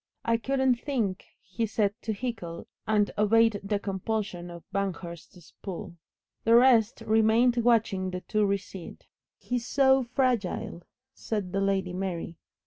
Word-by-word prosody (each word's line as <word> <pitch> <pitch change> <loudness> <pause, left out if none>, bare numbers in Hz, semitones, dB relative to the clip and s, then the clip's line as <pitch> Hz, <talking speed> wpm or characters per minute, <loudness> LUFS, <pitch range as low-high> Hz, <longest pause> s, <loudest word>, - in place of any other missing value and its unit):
"I 230 0 +3
couldn't 265 0 +1
think 230 -10 -2
" - - -53
he 225 +6 -2
said 205 -1 +1
to 220 - -3
Hickle, 200 -7 -5 0.2
and 210 -1 +2
obeyed 220 0 +4
the 205 +1 0
compulsion 195 -2 -3
of 170 -1 -10
Banghurst's 180 -3 -5
pull. 190 -1 -6 0.5
The 230 +1 +5
rest 235 -3 +5
remained 225 +3 +3
watching 225 -5 +2
the 180 0 -5
two 215 +2 0
recede. 195 -2 -4 0.3
"He 250 - -2
is 240 0 -5
so 270 -1 +4
fragile," 240 -8 -1 0.3
said 205 -5 -4
the 195 +1 0
Lady 190 -2 0
Mary. 175 -3 -4
210 Hz, 140 wpm, -28 LUFS, 190-230 Hz, 0.5 s, The